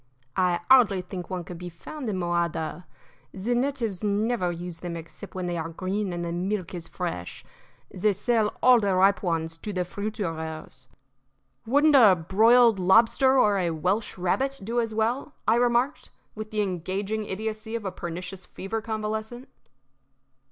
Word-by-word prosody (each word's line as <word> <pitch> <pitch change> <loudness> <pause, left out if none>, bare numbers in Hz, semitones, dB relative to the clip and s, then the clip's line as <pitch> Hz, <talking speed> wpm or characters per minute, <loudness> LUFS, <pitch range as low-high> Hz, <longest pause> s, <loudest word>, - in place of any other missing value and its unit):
"I 180 -2 +2
hardly 215 -8 +6
think 180 -1 -7
one 185 -2 -3
could 170 0 -9
be 180 0 -6
found 245 - -7
in 195 - -2
Mojada. 170 -1 -2 0.5
The 205 +6 -1
natives 240 -6 -1
never 210 -2 +1
use 175 -1 -7
them 175 -1 -5
except 165 +5 -11
when 185 -1 -3
they 175 -1 -2
are 165 0 -4
green 190 +4 -3
and 175 0 -3
the 170 - -3
milk 185 +1 -2
is 170 -2 -6
fresh. 165 - -5 0.5
They 210 +3 +2
sell 215 +1 0
all 250 -1 +7
the 200 -3 +1
ripe 195 +2 +4
ones 165 -2 -2
to 210 - -6
the 180 -2 -1
fruiterers." 165 - -5 0.8
"Wouldn't 290 +5 +4
a 220 -8 +8
broiled 220 +6 +4
lobster 225 +8 +4
or 205 -5 +4
a 175 -2 +1
Welsh 180 +8 -1
rabbit 265 +10 0
do 230 +4 -1
as 230 -1 -1
well?" 235 +7 -1
I 220 - +5
remarked, 245 +3 +1 0.2
with 215 0 -7
the 215 -1 -1
engaging 195 +3 -2
idiocy 215 +2 -4
of 225 -3 -4
a 190 - -2
pernicious 180 +2 -7
fever 220 +4 -4
convalescent. 220 +3 -4
195 Hz, 160 wpm, -26 LUFS, 175-225 Hz, 0.8 s, a